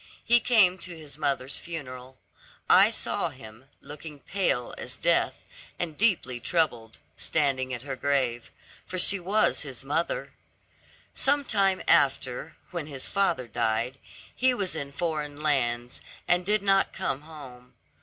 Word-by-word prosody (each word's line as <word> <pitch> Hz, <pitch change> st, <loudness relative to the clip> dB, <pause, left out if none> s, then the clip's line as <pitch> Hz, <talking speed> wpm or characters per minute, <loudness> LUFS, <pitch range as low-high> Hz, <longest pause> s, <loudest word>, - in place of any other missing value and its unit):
He 240 Hz, +1 st, +6 dB
came 205 Hz, -7 st, +4 dB
to 175 Hz, -2 st, -8 dB
his 150 Hz, -3 st, -9 dB
mother's 140 Hz, -2 st, -1 dB
funeral. 130 Hz, -6 st, -7 dB, 0.5 s
I -, -, +7 dB
saw -, -, -1 dB
him, 110 Hz, +4 st, -13 dB, 0.2 s
looking 150 Hz, +1 st, -9 dB
pale 140 Hz, -9 st, -1 dB
as -, -, -3 dB
death, -, -, +1 dB, 0.3 s
and 165 Hz, -3 st, -3 dB
deeply 165 Hz, -, +1 dB
troubled, 120 Hz, -7 st, -1 dB, 0.2 s
standing 135 Hz, -4 st, 0 dB
at 120 Hz, -1 st, -4 dB
her 135 Hz, -1 st, -4 dB
grave; 130 Hz, -4 st, 0 dB, 0.4 s
for 185 Hz, -, -4 dB
she 195 Hz, +2 st, +3 dB
was 200 Hz, +5 st, +2 dB
his -, -, -7 dB
mother. -, -, -1 dB, 0.8 s
Sometime 215 Hz, -9 st, +2 dB
after, 135 Hz, +2 st, +2 dB, 0.2 s
when 170 Hz, -4 st, -4 dB
his 135 Hz, -3 st, -7 dB
father 195 Hz, -11 st, 0 dB
died, 115 Hz, +3 st, -1 dB, 0.4 s
he 255 Hz, 0 st, +3 dB
was 190 Hz, -6 st, -2 dB
in 140 Hz, -3 st, -4 dB
foreign 150 Hz, -1 st, -3 dB
lands, 120 Hz, -5 st, 0 dB, 0.3 s
and 180 Hz, +1 st, +2 dB
did 210 Hz, -1 st, +2 dB
not 195 Hz, -1 st, +3 dB
come 145 Hz, -7 st, -2 dB
home. 135 Hz, -6 st, -12 dB
150 Hz, 135 wpm, -27 LUFS, 130-185 Hz, 0.8 s, I